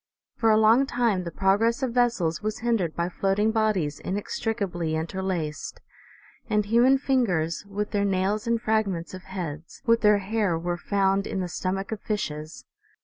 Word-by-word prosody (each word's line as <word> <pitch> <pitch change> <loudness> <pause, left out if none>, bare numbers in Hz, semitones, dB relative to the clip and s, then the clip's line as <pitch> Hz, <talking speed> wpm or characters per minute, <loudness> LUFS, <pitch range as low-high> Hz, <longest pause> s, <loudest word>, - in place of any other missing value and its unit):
For 225 - +2
a 215 - +5
long 225 +5 +5
time 230 -8 0
the - - -3
progress 210 - +2
of 250 -3 -1
vessels 230 -10 +1
was 215 0 -2
hindered 205 -9 +1
by 170 0 0
floating 195 +4 +1
bodies 210 -9 0
inextricably 195 -4 -2
interlaced; 165 -1 -3 0.7
and 210 -1 +2
human 240 +5 +4
fingers, 210 - 0
with 205 +1 -3
their 205 -1 +1
nails, 200 +2 0
and 230 0 +2
fragments 215 -7 -1
of 185 - -7
heads, 165 -5 -7
with 230 -1 +3
their 210 -1 +5
hair 200 -3 0
were 175 +1 -2
found 195 +2 +1
in 195 - -3
the 180 - -2
stomachs 190 +4 -3
of 215 - -7
fishes. 155 -7 -4
200 Hz, 160 wpm, -26 LUFS, 175-220 Hz, 0.7 s, a